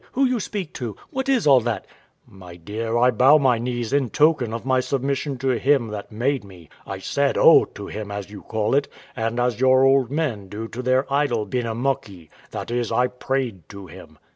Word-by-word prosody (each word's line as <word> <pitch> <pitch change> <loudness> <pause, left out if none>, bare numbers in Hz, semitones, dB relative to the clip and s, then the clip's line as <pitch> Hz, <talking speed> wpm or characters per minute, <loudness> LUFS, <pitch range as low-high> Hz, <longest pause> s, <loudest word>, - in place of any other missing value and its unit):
Who 270 +2 +2
you 250 -2 +1
speak 195 -4 -5
to? 115 -5 -4 0.2
What 265 +1 -3
is 260 -8 +2
all 135 -4 +6
that? 120 0 -3 0.4
W.A. - - -20
My 90 -2 -11
dear, 110 +7 -3
I 125 +1 +4
bow 130 +6 +6
my 130 -5 +2
knees 120 -1 -3
in 140 -4 +1
token 145 -6 +2
of 115 +1 -5
my 130 -1 +2
submission 135 +1 -2
to 135 +2 -1
Him 135 -5 +2
that 105 0 -7
made 125 +4 -1
me: 90 -5 -15 0.2
I 95 - -5
said 140 +8 0
O - - +7
to - - -10
Him, 105 -1 -6
as 100 -1 -6
you 105 - -9
call 110 +1 -2
it, 140 +1 +2 0.3
and 115 +2 -2
as 120 -2 0
your 130 0 +5
old 135 -2 +4
men 135 -10 -2
do 110 +3 -6
to 125 - -6
their 130 +2 +2
idol 140 -7 +1
Benamuckee; 115 - -3 0.2
that - - -6
is, 120 -1 -1
I 125 - +3
prayed 125 - -3
to 100 -1 -10
Him. 80 - -13
125 Hz, 210 wpm, -22 LUFS, 110-135 Hz, 0.4 s, O